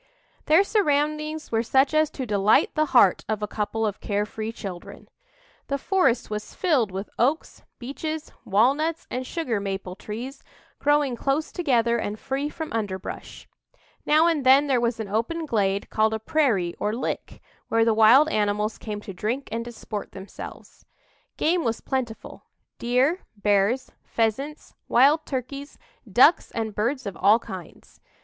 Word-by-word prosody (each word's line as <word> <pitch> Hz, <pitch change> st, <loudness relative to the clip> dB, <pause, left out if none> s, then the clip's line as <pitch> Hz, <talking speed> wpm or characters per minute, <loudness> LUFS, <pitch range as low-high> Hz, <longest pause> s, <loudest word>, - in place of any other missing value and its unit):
Their 320 Hz, +6 st, +5 dB
surroundings 305 Hz, -5 st, 0 dB
were 225 Hz, -1 st, +2 dB
such 265 Hz, +5 st, +2 dB
as 310 Hz, 0 st, +3 dB
to 265 Hz, -, -5 dB
delight 205 Hz, -1 st, +3 dB
the 310 Hz, 0 st, +1 dB
heart 240 Hz, -9 st, +4 dB
of 215 Hz, -1 st, -1 dB
a -, -, -1 dB
couple 220 Hz, +2 st, -2 dB
of 210 Hz, -2 st, -3 dB
care 205 Hz, 0 st, -1 dB
free 220 Hz, +1 st, -5 dB
children. 190 Hz, -6 st, -9 dB, 0.6 s
The 280 Hz, -, -1 dB
forest 275 Hz, -7 st, +1 dB
was 210 Hz, 0 st, -6 dB
filled 295 Hz, -, +2 dB
with 190 Hz, +2 st, -6 dB
oaks, 280 Hz, +7 st, 0 dB, 0.2 s
beeches, 305 Hz, +5 st, -5 dB
walnuts 280 Hz, +11 st, +1 dB
and 255 Hz, 0 st, -3 dB
sugar 255 Hz, -11 st, -2 dB
maple 195 Hz, -2 st, -4 dB
trees, 235 Hz, +8 st, -7 dB, 0.4 s
growing 290 Hz, -3 st, +2 dB
close 275 Hz, +6 st, -1 dB
together 235 Hz, -8 st, +1 dB
and 210 Hz, -1 st, -3 dB
free 275 Hz, +2 st, -2 dB
from 315 Hz, 0 st, -6 dB
underbrush. 200 Hz, -4 st, -5 dB, 0.6 s
Now 310 Hz, +2 st, +4 dB
and 325 Hz, -4 st, +1 dB
then 265 Hz, +3 st, +6 dB
there 260 Hz, -4 st, +1 dB
was 235 Hz, -1 st, 0 dB
an 220 Hz, -, -4 dB
open 235 Hz, +11 st, -2 dB
glade 200 Hz, -7 st, 0 dB
called 220 Hz, 0 st, +2 dB
a -, -, -4 dB
prairie 220 Hz, -, +1 dB
or 210 Hz, +1 st, -1 dB
"lick," 245 Hz, -, -4 dB, 0.3 s
where 225 Hz, 0 st, +2 dB
the 225 Hz, -, +3 dB
wild 225 Hz, +7 st, +6 dB
animals 210 Hz, -2 st, 0 dB
came 210 Hz, -2 st, -5 dB
to 205 Hz, -2 st, -8 dB
drink 230 Hz, +9 st, -3 dB
and 230 Hz, +1 st, -2 dB
disport 230 Hz, -3 st, -7 dB
themselves. 190 Hz, +1 st, -10 dB, 0.5 s
Game 340 Hz, +2 st, +1 dB
was 230 Hz, -2 st, -1 dB
plentiful 250 Hz, -4 st, -5 dB, 0.3 s
deer, 255 Hz, +9 st, +2 dB, 0.2 s
bears, 205 Hz, +5 st, +1 dB
pheasants, 265 Hz, +7 st, -2 dB
wild 285 Hz, +6 st, +4 dB
turkeys, 275 Hz, +2 st, -5 dB, 0.3 s
ducks 265 Hz, -, +5 dB
and 220 Hz, -2 st, -2 dB
birds 245 Hz, +5 st, -1 dB
of 200 Hz, -3 st, -5 dB
all 205 Hz, +3 st, +5 dB
kinds. 185 Hz, -7 st, -11 dB
235 Hz, 155 wpm, -25 LUFS, 210-290 Hz, 0.6 s, then